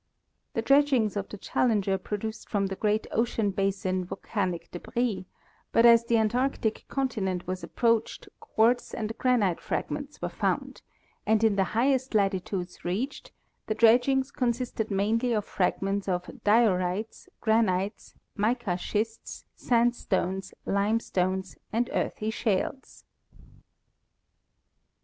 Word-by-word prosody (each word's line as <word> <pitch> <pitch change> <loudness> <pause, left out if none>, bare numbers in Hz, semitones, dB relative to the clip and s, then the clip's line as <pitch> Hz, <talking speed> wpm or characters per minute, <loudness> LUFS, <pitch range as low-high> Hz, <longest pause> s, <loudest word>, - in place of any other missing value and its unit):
The - - 0
dredgings 275 -7 +3
of 200 -1 -3
the 210 - -7
Challenger 205 -2 +1
produced 215 +3 -5
from 200 -2 +1
the 195 0 -3
great 210 +2 0
ocean 225 -2 +1
basins 190 -1 -1
volcanic 185 -4 -3
débris, 225 +2 -2 0.5
but 230 - +5
as 235 0 +7
the 235 0 +2
Antarctic 225 +1 0
continent 200 -10 -2
was 185 0 -4
approached 230 -2 0
quartz 235 +3 +1
and 220 0 -3
granite 225 -9 +2
fragments 285 0 -4
were - - -2
found, - - -2 0.5
and 220 0 +3
in 220 -2 +4
the 195 - +3
highest 260 0 +2
latitudes 190 -2 -1
reached 220 +11 -3 0.4
the 215 - -1
dredgings 250 +4 +4
consisted 240 -3 -1
mainly 220 +5 +1
of 210 -2 0
fragments 195 +2 -1
of 180 -1 -1 0.2
diorites, 205 -2 +1
granites, 210 -3 0 0.2
mica 215 -3 0
schists, 220 +4 -3
sandstones, 230 -6 0
limestones, 190 -3 0
and 235 +2 0
earthy 215 +1 -1
shales. 220 +4 -2
215 Hz, 115 wpm, -28 LUFS, 195-235 Hz, 0.5 s, as